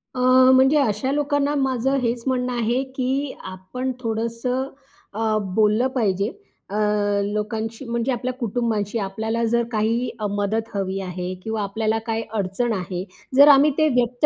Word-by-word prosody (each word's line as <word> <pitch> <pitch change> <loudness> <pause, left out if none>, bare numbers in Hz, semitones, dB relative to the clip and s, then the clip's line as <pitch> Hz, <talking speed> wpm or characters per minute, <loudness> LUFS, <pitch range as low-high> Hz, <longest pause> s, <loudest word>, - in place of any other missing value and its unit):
अ, - - -3 0.4
म्हणजे 265 +3 +5
अशा 260 0 0
लोकांना 285 0 +1
माझं 265 -1 +1
हेच 235 -1 -1
म्हणणं 250 -1 0
आहे, 240 +2 0
की 265 +2 -1
आपण 190 +8 -5
थोडंसं 230 +3 -2 0.4
अ, 220 0 0 0.2
बोललं 215 +3 +3
पाहिजे 200 -5 +1 0.4
अ, 200 - -5 0.5
लोकांशी 220 +4 -3
म्हणजे 235 +2 -1
आपल्या 255 +1 -2
कुटुंबाशी. 225 -2 -1
आपल्याला 220 +4 -2
जर 235 0 +3
काही 230 +3 0
अ, 215 - -2
मदत 205 +3 -1
हवी 195 -1 -2
आहे 180 0 -4
किंवा 220 -1 -2
आपल्याला 220 +2 -1
काही 225 0 -1 0.2
अडचण 205 +5 -1
आहे. 185 -1 -3 0.3
जर 285 +2 +8
आम्ही 285 +2 +5
ते 310 -1 +4
व्यक्त 245 0 +2
230 Hz, 145 wpm, -22 LUFS, 210-255 Hz, 0.5 s, जर